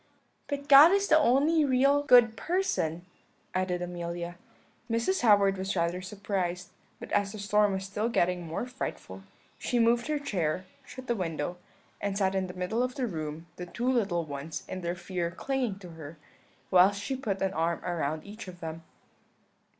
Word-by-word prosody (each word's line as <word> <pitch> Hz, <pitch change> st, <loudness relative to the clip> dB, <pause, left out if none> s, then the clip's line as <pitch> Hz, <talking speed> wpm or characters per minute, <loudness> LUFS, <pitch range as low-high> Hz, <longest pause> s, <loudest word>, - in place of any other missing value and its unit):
"'But 285 Hz, -1 st, -4 dB
God 290 Hz, +4 st, +9 dB
is 400 Hz, 0 st, +2 dB
the 315 Hz, -, +6 dB
only 300 Hz, +4 st, +3 dB
real 275 Hz, +1 st, +3 dB
good 245 Hz, -5 st, +6 dB
person,' 200 Hz, -, -1 dB, 0.5 s
added 185 Hz, -1 st, -1 dB
Amelia. 175 Hz, 0 st, -5 dB, 0.5 s
"Mrs. 230 Hz, +12 st, 0 dB
Howard 200 Hz, -4 st, +4 dB
was 190 Hz, +1 st, -2 dB
rather 170 Hz, +1 st, 0 dB
surprised, 185 Hz, -2 st, -3 dB, 0.3 s
but -, -, -9 dB
as 200 Hz, 0 st, +1 dB
the -, -, -7 dB
storm 205 Hz, 0 st, +2 dB
was 190 Hz, 0 st, -3 dB
still 210 Hz, +4 st, -2 dB
getting 180 Hz, -5 st, +1 dB
more 165 Hz, +7 st, -4 dB
frightful, 250 Hz, -, -6 dB, 0.4 s
she 245 Hz, -, -1 dB
moved 235 Hz, +2 st, +3 dB
her 305 Hz, -1 st, 0 dB
chair, 185 Hz, -, -2 dB, 0.2 s
shut 255 Hz, 0 st, -10 dB
the 240 Hz, -, 0 dB
window, 175 Hz, -2 st, -3 dB, 0.4 s
and 200 Hz, -1 st, -2 dB
sat 190 Hz, -2 st, +1 dB
in 190 Hz, -1 st, -1 dB
the 180 Hz, -, -9 dB
middle 185 Hz, +6 st, -1 dB
of 255 Hz, 0 st, -1 dB
the 265 Hz, -3 st, -1 dB
room; 160 Hz, -5 st, -5 dB
the 180 Hz, -, -6 dB
two 245 Hz, +7 st, -1 dB
little 195 Hz, -8 st, 0 dB
ones 145 Hz, +2 st, -6 dB
in 185 Hz, -, -5 dB
their 170 Hz, 0 st, -2 dB
fear 175 Hz, -1 st, -3 dB
clinging 245 Hz, +2 st, -2 dB
to 185 Hz, -3 st, -11 dB
her, 160 Hz, -1 st, -10 dB, 0.5 s
whilst 190 Hz, +2 st, +5 dB
she 265 Hz, +6 st, -3 dB
put 215 Hz, -7 st, -3 dB
an 190 Hz, 0 st, 0 dB
arm 165 Hz, 0 st, 0 dB
round 160 Hz, -3 st, -2 dB
each 210 Hz, +1 st, -9 dB
of 180 Hz, -1 st, -10 dB
them. 165 Hz, 0 st, -6 dB
195 Hz, 175 wpm, -29 LUFS, 175-245 Hz, 0.5 s, God